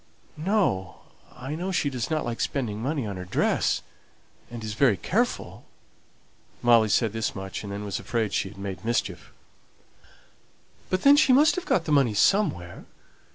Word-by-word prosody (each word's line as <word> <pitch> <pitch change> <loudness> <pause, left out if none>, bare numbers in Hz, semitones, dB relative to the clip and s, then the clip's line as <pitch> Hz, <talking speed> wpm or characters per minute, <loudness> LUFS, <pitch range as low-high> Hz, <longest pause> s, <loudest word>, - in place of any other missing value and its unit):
"No. 155 - -1 0.3
I 130 +4 -7
know 180 +4 -3
she 145 -6 0
doesn't 135 +5 -2
like 120 -1 -4
spending 110 -6 -2
money 140 0 -2
on 100 -3 -5
her 90 - -6
dress, 90 - 0 0.7
and 120 -2 -8
is 110 -1 -4
very 115 -3 +3
careful." 85 - -2 1.0
Molly 115 -2 +5
said 110 0 +2
this 115 -1 -2
much, 95 -1 -6
and 100 - -6
then 100 +1 -5
was 100 - -3
afraid 110 -4 -2
she 95 - -1
had 95 - -15
made 100 0 -6
mischief. 95 -8 -2 1.6
"But 185 0 -1
then 280 +1 +7
she 270 -3 +5
must 300 +5 +5
have 365 0 -5
got 165 - +1
the 155 - -3
money 135 -7 +3
somewhere. 100 - +1
115 Hz, 160 wpm, -26 LUFS, 100-155 Hz, 1.6 s, then